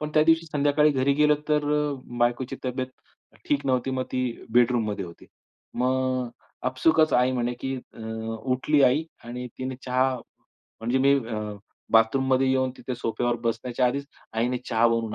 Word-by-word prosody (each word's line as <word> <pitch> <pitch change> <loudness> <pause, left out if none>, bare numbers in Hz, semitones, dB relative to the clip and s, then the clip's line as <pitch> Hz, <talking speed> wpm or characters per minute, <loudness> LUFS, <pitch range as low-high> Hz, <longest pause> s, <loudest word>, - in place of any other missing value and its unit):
पण 150 0 -3
त्या 155 - +6
दिवशी 165 0 +3
संध्याकाळी 150 0 +3
घरी 135 0 +2
गेलो, 150 0 +4
तर 150 -1 +2
अ, 150 -1 +1 0.2
बायकोची 120 +2 0
तब्येत 130 0 -2 0.6
ठीक 145 -1 +1
नव्हती. 130 0 +1
मग 130 -1 -1
ती 130 0 0 0.3
बेडरूममध्ये 115 -4 +2
होती. 85 -1 -12 0.5
मग 130 0 0 0.4
आपसूकच 155 +5 +3
आई 125 +1 +3
म्हणे 120 -1 0
की 135 0 -2
अ, 125 - -12 0.5
उठली 145 +3 +2
आई 140 +5 +4 0.2
आणि 125 +1 -6
तिने 130 0 -4
चहा 130 +1 +2 0.7
म्हणजे 120 +4 +1
मी 140 +1 +5
अ, 110 -2 -3 0.5
बाथरूममध्ये 130 +4 +4
येऊन 130 -1 +2
तिथे 130 - -4
सोफ्यावर 120 0 -1
बसण्याच्या 120 +2 0
आधीच 140 +3 -1 0.3
आईने 120 +2 0
चहा 115 -1 +3
बनवून 115 -2 -1
130 Hz, 155 wpm, -26 LUFS, 120-140 Hz, 0.7 s, त्या